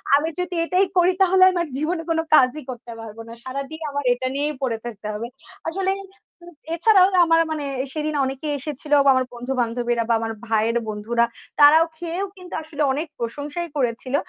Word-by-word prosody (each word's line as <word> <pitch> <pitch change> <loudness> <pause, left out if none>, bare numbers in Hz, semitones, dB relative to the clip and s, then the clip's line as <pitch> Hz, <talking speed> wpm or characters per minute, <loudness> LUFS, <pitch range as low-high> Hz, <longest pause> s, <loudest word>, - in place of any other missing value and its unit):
আমি 300 +3 +1
যদি 360 0 -3
এটাই 365 +3 +2
করি 355 +1 +5
তাহলে 375 0 +4
আমার 345 -3 -1
জীবনে 325 +4 -1
কোনো 325 0 +2
কাজই 265 +3 +4
করতে 240 -1 -10
পারবো 225 0 -9
না। 230 - -9
সারাদিন 275 +4 -6
আমার 285 0 -3
এটা 250 +1 -3
নিয়েই 295 +1 -1
পড়ে 245 -4 -1
থাকতে 215 -3 -7
হবে।" 220 +3 -4 0.4
আসলে 380 +3 0 0.5
উ - - -15 0.3
এছাড়াও 370 +2 +5 0.2
আমার 330 0 +4
মানে 305 -2 -2 0.3
সেদিন 305 -1 -2
অনেকে 270 +3 -3
এসেছিল 295 +1 -3
বা - - +6
আমার 260 0 +1
বন্ধু-বান্ধবীরা 240 -1 -1
বা - - +4
আমার 225 0 -3
ভাইয়ের 225 +1 +1
বন্ধুরা, 225 +3 0 0.3
তারাও 305 +3 +8
খেয়েও 345 +3 -3
কিন্তু 365 -1 -12
আসলে 310 -1 -6
অনেক 300 +5 -2
প্রশংসাই 290 +8 -4
করেছিল। 255 0 -1
285 Hz, 170 wpm, -22 LUFS, 240-330 Hz, 0.5 s, তারাও